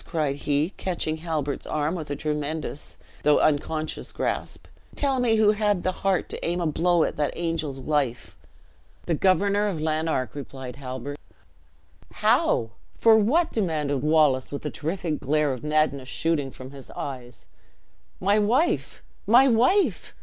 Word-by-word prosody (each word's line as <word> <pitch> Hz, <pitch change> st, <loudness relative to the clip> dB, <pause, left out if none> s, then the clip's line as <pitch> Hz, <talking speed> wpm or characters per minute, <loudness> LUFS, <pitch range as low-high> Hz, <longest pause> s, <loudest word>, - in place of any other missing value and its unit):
cried 150 Hz, -5 st, -1 dB
he, 145 Hz, +4 st, 0 dB
catching 170 Hz, -4 st, -2 dB
Halbert's 155 Hz, -4 st, -3 dB
arm 150 Hz, +2 st, -1 dB
with 160 Hz, -5 st, -5 dB
a 145 Hz, -, -2 dB
tremendous 150 Hz, 0 st, -4 dB, 0.2 s
though 150 Hz, 0 st, +4 dB
unconscious 155 Hz, +1 st, -1 dB
grasp; -, -, -3 dB, 0.3 s
"tell 275 Hz, -2 st, +1 dB
me 235 Hz, -3 st, +3 dB
who 215 Hz, -1 st, +5 dB
had 210 Hz, -3 st, 0 dB
the 185 Hz, -, +1 dB
heart 190 Hz, 0 st, 0 dB
to -, -, -7 dB
aim 175 Hz, +1 st, -1 dB
a 175 Hz, -, -1 dB
blow 170 Hz, +2 st, +2 dB
at -, -, -2 dB
that 150 Hz, -1 st, -1 dB
angel's 165 Hz, -5 st, -2 dB
life?" 135 Hz, -3 st, -2 dB, 0.7 s
"The 170 Hz, -, 0 dB
Governor 200 Hz, +4 st, +2 dB
of 185 Hz, -6 st, -2 dB
Lanark," 155 Hz, -3 st, -1 dB
replied 135 Hz, -3 st, -8 dB
Halbert. 135 Hz, +1 st, -6 dB, 0.9 s
"How? 115 Hz, -1 st, +2 dB, 0.3 s
for 225 Hz, -1 st, +6 dB
what?" 295 Hz, +11 st, +3 dB
demanded 150 Hz, -, -1 dB
Wallace, 150 Hz, -4 st, +3 dB
with 140 Hz, -, -5 dB
the 150 Hz, -, -3 dB
terrific 160 Hz, +2 st, -3 dB
glare 150 Hz, 0 st, +1 dB
of 130 Hz, -, -8 dB
madness 150 Hz, -3 st, 0 dB
shooting 155 Hz, -4 st, 0 dB
from 130 Hz, 0 st, -10 dB
his 140 Hz, -2 st, -11 dB
eyes. 125 Hz, -3 st, -7 dB, 0.7 s
"My 200 Hz, +3 st, +3 dB
wife! 240 Hz, +11 st, +1 dB, 0.2 s
my 245 Hz, +5 st, +7 dB
wife! 255 Hz, -, +2 dB
155 Hz, 150 wpm, -25 LUFS, 145-190 Hz, 0.9 s, my